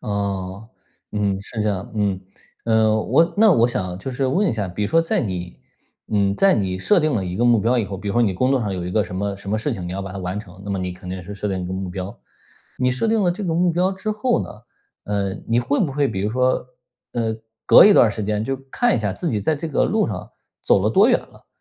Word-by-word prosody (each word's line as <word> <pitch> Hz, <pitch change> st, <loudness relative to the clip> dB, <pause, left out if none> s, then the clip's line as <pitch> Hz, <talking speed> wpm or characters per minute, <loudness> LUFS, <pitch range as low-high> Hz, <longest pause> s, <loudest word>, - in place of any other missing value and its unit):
哦， 100 Hz, 0 st, -3 dB, 0.4 s
嗯， 100 Hz, -2 st, 0 dB
是 110 Hz, +2 st, -5 dB
这 105 Hz, -, +1 dB
样 100 Hz, -1 st, -3 dB
嗯。 100 Hz, -3 st, 0 dB, 0.4 s
呃， 110 Hz, -1 st, +3 dB
我 165 Hz, +7 st, +3 dB
那 220 Hz, 0 st, +6 dB
我 115 Hz, 0 st, +4 dB
想 95 Hz, -6 st, -3 dB
就 130 Hz, -, -5 dB
是 130 Hz, +1 st, -1 dB
问 190 Hz, +11 st, +2 dB
一 -, -, +1 dB
下， 105 Hz, -4 st, -3 dB
比 90 Hz, +4 st, -4 dB
如 -, -, -1 dB
说 165 Hz, 0 st, +4 dB
在 205 Hz, +4 st, 0 dB
你 90 Hz, -5 st, -4 dB, 0.6 s
嗯， 100 Hz, -1 st, +2 dB
在 195 Hz, -1 st, +4 dB
你 95 Hz, -3 st, -1 dB
设 195 Hz, -, +3 dB
定 155 Hz, -2 st, +1 dB
了 100 Hz, -4 st, 0 dB
一 90 Hz, +1 st, -4 dB
个 120 Hz, -, +1 dB
目 120 Hz, -2 st, +5 dB
标 120 Hz, +4 st, +2 dB
以 110 Hz, -, +1 dB
后， 95 Hz, 0 st, -6 dB
比 100 Hz, +2 st, -6 dB
如 -, -, -1 dB
说 120 Hz, -, +3 dB
你 105 Hz, -4 st, +2 dB
工 130 Hz, +7 st, +1 dB
作 135 Hz, -2 st, +2 dB
上 105 Hz, -4 st, -2 dB
有 90 Hz, -2 st, -4 dB
一 -, -, -4 dB
个 105 Hz, +2 st, +2 dB
什 90 Hz, 0 st, -7 dB
么 100 Hz, +1 st, -2 dB
什 100 Hz, 0 st, -8 dB
么 110 Hz, -, +1 dB
事 110 Hz, -, -2 dB
情， 90 Hz, -2 st, -5 dB
你 90 Hz, -, -5 dB
要 95 Hz, -, -3 dB
把 95 Hz, -1 st, -6 dB
它 100 Hz, -, -6 dB
完 90 Hz, +2 st, -3 dB
成， 95 Hz, -3 st, -11 dB
那 100 Hz, -, -5 dB
么 95 Hz, -, -1 dB
你 90 Hz, -1 st, -3 dB
肯 90 Hz, 0 st, -11 dB
定 95 Hz, 0 st, -5 dB
是 100 Hz, +3 st, -8 dB
设 105 Hz, +1 st, -3 dB
定 95 Hz, -2 st, -2 dB
一 -, -, -4 dB
个 90 Hz, -, -5 dB
目 95 Hz, 0 st, -4 dB
标。 95 Hz, +1 st, -6 dB, 0.6 s
你 125 Hz, 0 st, +2 dB
设 125 Hz, -, -1 dB
定 220 Hz, -1 st, +2 dB
了 180 Hz, -, +3 dB
这 200 Hz, +4 st, -4 dB
个 165 Hz, -3 st, -1 dB
目 175 Hz, +1 st, +3 dB
标 180 Hz, +3 st, +1 dB
之 190 Hz, +3 st, -4 dB
后 225 Hz, +3 st, 0 dB
呢， -, -, -7 dB, 0.6 s
呃， 100 Hz, -2 st, -1 dB
你 115 Hz, +1 st, +2 dB
会 140 Hz, +4 st, 0 dB
不 150 Hz, -7 st, 0 dB
会 140 Hz, -1 st, +1 dB
比 95 Hz, -, -3 dB
如 105 Hz, +2 st, -1 dB
说 125 Hz, +1 st, +1 dB, 0.5 s
呃， 115 Hz, -2 st, -1 dB, 0.3 s
隔 -, -, +8 dB
一 205 Hz, -, +8 dB
段 120 Hz, -, +6 dB
儿 -, -, -1 dB
时 105 Hz, +1 st, -5 dB
间 105 Hz, 0 st, -1 dB
就 135 Hz, +3 st, -2 dB
看 245 Hz, -, +2 dB
一 -, -, 0 dB
下 105 Hz, -3 st, -1 dB
自 170 Hz, -, -3 dB
己 105 Hz, -, -1 dB
在 155 Hz, +10 st, +1 dB
这 155 Hz, +2 st, -5 dB
个 145 Hz, -, +1 dB
路 -, -, +1 dB
上 -, -, -5 dB, 0.3 s
走 95 Hz, -, +3 dB
了 105 Hz, -, +2 dB
多 205 Hz, -, +5 dB
远 245 Hz, -, +5 dB
了， -, -, -19 dB
105 Hz, 305 characters per minute, -21 LUFS, 95-135 Hz, 0.6 s, 隔